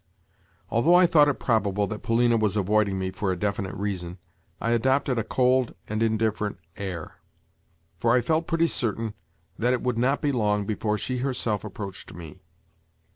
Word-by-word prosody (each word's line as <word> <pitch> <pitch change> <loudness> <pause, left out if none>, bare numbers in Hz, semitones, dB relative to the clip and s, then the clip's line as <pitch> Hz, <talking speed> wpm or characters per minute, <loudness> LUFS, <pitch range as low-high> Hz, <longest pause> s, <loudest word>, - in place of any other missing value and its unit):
Although 150 +10 +4
I 180 0 +7
thought 150 -3 +5
it 145 - +1
probable 105 -4 +1
that 105 +1 -6
Polina 115 +1 +2
was 110 -2 +1
avoiding 100 0 +2
me 95 0 -2
for 95 0 -2
a 90 - -2
definite 100 0 -2
reason, 95 -3 -4 0.4
I 115 - -1
adopted 130 +1 +2
a - - 0
cold 125 +2 +1
and 110 +1 -2
indifferent 110 -2 0 0.2
air; 95 -6 -6 0.8
for 115 +1 +3
I 125 - +4
felt 160 +7 0
pretty 165 -1 +2
certain 115 -7 0 0.5
that 120 +2 +2
it 125 - -2
would 125 -2 0
not 135 +4 +2
be 145 - 0
long 105 -5 +1
before 105 0 -1
she 125 +3 -2
herself 120 -6 -1
approached 100 -5 -7
me. 85 +1 -10
110 Hz, 170 wpm, -26 LUFS, 100-125 Hz, 0.8 s, I